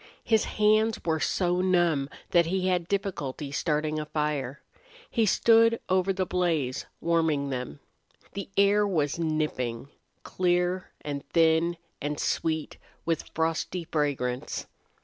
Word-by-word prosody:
His 220 -2 +2
hands 215 +1 +3
were 160 -1 +1
so 180 +4 +1
numb 175 -7 +2 0.2
that 170 -2 +4
he 185 +1 0
had 180 -2 +1
difficulty 155 -8 -3
starting 155 +1 0
a 150 - -3
fire. 145 -4 -2 0.5
He 225 -3 +2
stood 230 +2 +5
over 185 +1 +2
the 190 -1 -1
blaze, 165 -8 -1
warming 160 -4 +1
them. 125 - -4 0.5
The 200 - -5
air 205 +1 +4
was 155 -5 0
nipping, 150 -6 -2 0.3
clear 180 0 0
and 145 -1 -4
thin, 165 +1 +3 0.2
and 145 +1 -3
sweet 160 -1 -1 0.3
with 165 -2 -1
frosty 165 +2 -1
fragrance. 140 -6 -2
165 Hz, 125 wpm, -27 LUFS, 150-185 Hz, 0.5 s, stood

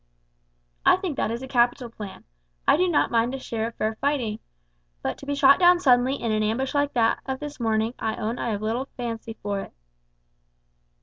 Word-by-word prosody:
"I - - +6
think 365 -5 -4
that - - 0
is 235 +3 -4
a - - -6
capital 245 0 +2
plan. 210 -4 -9 0.4
I - - +7
do 365 +4 +2
not 320 - +2
mind 235 +2 +1
a - - -3
share 225 -3 -3
of 230 - -9
fair 215 +1 -1
fighting; 250 -7 0 0.6
but - - -1
to 280 - -11
be 285 - -1
shot 280 +1 +6
down 355 0 +6
suddenly 255 -3 +4
in 230 -5 -2
an 215 0 +1
ambush 230 +5 -1
like 285 0 +1
that 230 -1 +3
of 265 -1 -3
this 295 -1 -7
morning, 225 0 0
I 220 0 -1
own 230 +2 -3
I - - -2
have 210 -1 -3
little 230 +5 -1
fancy 230 -2 -4
for 200 -1 -1
it." - - -8
240 Hz, 205 wpm, -25 LUFS, 220-275 Hz, 0.6 s, I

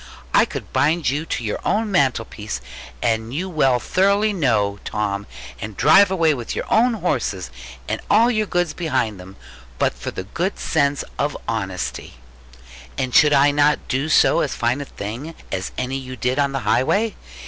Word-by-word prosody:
I - - +6
could - - -8
bind 155 -3 +2
you 150 +4 -3
to 120 - -3
your 105 - -2
own 215 0 0
mantelpiece, 115 - 0 0.4
as 115 -2 +2
you 140 +12 -5
know 135 -6 +3
thoroughly 200 - +2
well, 105 - +1
Tom; 100 -1 -2 0.3
and 105 -1 -7
drive 185 +8 +6
away 165 -5 +3
with 120 -5 -5
your - - -3
own 240 +1 +4
horses, - - -2 0.4
and - - -2
all 230 +4 +5
your 215 -2 0
goods 175 -4 0
behind 115 - -1
them, 95 +1 -11 0.4
but - - +1
for - - -6
the 95 - -6 0.3
sense 145 -3 0 0.2
of 145 +1 -1
honesty. 95 - -4 0.8
And 125 -1 -2
should 150 -2 +6
I 145 0 +5
not 145 +1 +2
do 135 +3 0 0.4
as 140 - -2
fine 120 +3 0
a - - -5
thing 125 +10 -7 0.2
as 95 -1 -3
any 130 +1 -2
you 130 -1 -7
did 125 +3 -1
on 140 -1 +2
the 135 -1 -2
highway? 205 - +1
140 Hz, 170 wpm, -21 LUFS, 115-165 Hz, 0.8 s, I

